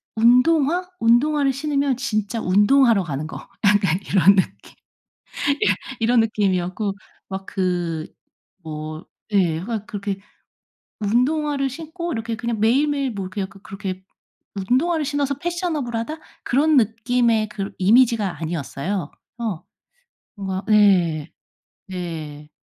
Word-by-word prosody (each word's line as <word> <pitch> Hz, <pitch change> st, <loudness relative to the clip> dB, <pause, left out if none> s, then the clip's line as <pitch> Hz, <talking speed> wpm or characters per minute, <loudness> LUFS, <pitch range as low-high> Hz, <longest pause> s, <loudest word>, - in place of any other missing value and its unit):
운동화, 285 Hz, +9 st, +4 dB
운동화를 275 Hz, +5 st, +3 dB
신으면 280 Hz, -1 st, 0 dB
진짜 225 Hz, -4 st, -2 dB
운동하러 210 Hz, +4 st, +4 dB
가는 150 Hz, -2 st, -4 dB
거. 160 Hz, -, -7 dB, 0.3 s
약간 200 Hz, -4 st, +3 dB
이런 195 Hz, +1 st, +5 dB
느낌. 185 Hz, -, -2 dB, 0.9 s
예 -, -, +4 dB, 0.3 s
이런 235 Hz, +1 st, +4 dB
느낌이었고 200 Hz, -2 st, 0 dB, 0.4 s
막 190 Hz, 0 st, -6 dB
그 175 Hz, -4 st, -1 dB, 0.6 s
뭐 155 Hz, +1 st, -6 dB, 0.3 s
예 180 Hz, -6 st, +3 dB
하여간 215 Hz, +3 st, -4 dB
그렇게 200 Hz, -1 st, -4 dB, 0.8 s
운동화를 275 Hz, +6 st, +1 dB
신고 330 Hz, +5 st, -6 dB
이렇게 230 Hz, -1 st, -3 dB
그냥 235 Hz, -1 st, -3 dB
매일매일 275 Hz, +4 st, +2 dB
뭐 195 Hz, -3 st, -4 dB
그냥 190 Hz, 0 st, -4 dB
그 200 Hz, -1 st, -16 dB
그렇게 190 Hz, -1 st, -6 dB, 0.5 s
운동화를 265 Hz, -, +1 dB
신어서 285 Hz, 0 st, 0 dB
패셔너블하다 310 Hz, -6 st, -3 dB, 0.3 s
그런 295 Hz, +4 st, +3 dB
느낌의 230 Hz, 0 st, +2 dB
그러 200 Hz, -2 st, -4 dB
이미지가 215 Hz, -, +3 dB
아니었어요. 165 Hz, +3 st, -3 dB, 0.3 s
어. 215 Hz, -8 st, -3 dB, 0.7 s
뭔가 190 Hz, -1 st, -4 dB
네. 185 Hz, -8 st, +3 dB, 0.6 s
네. 160 Hz, -5 st, -6 dB
215 Hz, 265 characters per minute, -22 LUFS, 190-265 Hz, 0.9 s, 이런